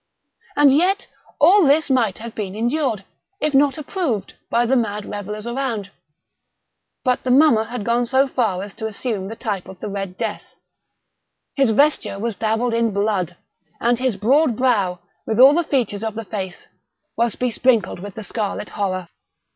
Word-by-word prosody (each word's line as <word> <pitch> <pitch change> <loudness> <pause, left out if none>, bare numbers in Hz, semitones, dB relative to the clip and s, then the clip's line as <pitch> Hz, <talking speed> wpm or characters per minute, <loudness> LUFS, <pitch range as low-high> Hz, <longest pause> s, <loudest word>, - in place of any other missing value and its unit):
And 290 -2 +6
yet 375 +6 +2 0.3
all 360 +7 +6
this 290 +1 +3
might 230 -7 +2
have 230 0 -8
been 200 -3 -5
endured, 240 -2 -1 0.4
if 305 -1 0
not 275 0 +4
approved, 285 - -3 0.2
by 235 +1 +2
the 260 +3 +2
mad 210 -4 -1
revellers 210 +1 -6
around. 235 -5 -3 1.1
But 250 -2 +1
the 255 - -2
mummer 250 -4 +5
had 235 -3 -5
gone 235 +1 +1
so 265 +2 +3
far 215 -8 -1
as 200 -1 -9
to 220 - -3
assume 215 -2 -3
the 225 - -6
type 205 -5 -4
of 190 - -11
the 210 - -5
Red 195 -2 -5
Death. 220 -3 -5 1.0
His 270 -4 +3
vesture 280 -2 +2
was 225 +1 -3
dabbled 225 +3 0
in 230 -1 +1
blood—and 200 +2 -2
his 255 -4 0
broad 255 +5 +3
brow, 205 -8 +1 0.3
with 220 +1 -1
all 265 +3 +9
the 345 +2 +2
features 240 -8 -1
of 220 -1 -3
the 225 0 -5
face, 190 -4 -6 0.5
was 235 -2 0
besprinkled 235 -6 +1
with 200 +1 -8
the 220 - -6
scarlet 210 -1 -3
horror. 185 -3 -2
230 Hz, 165 wpm, -21 LUFS, 205-260 Hz, 1.1 s, all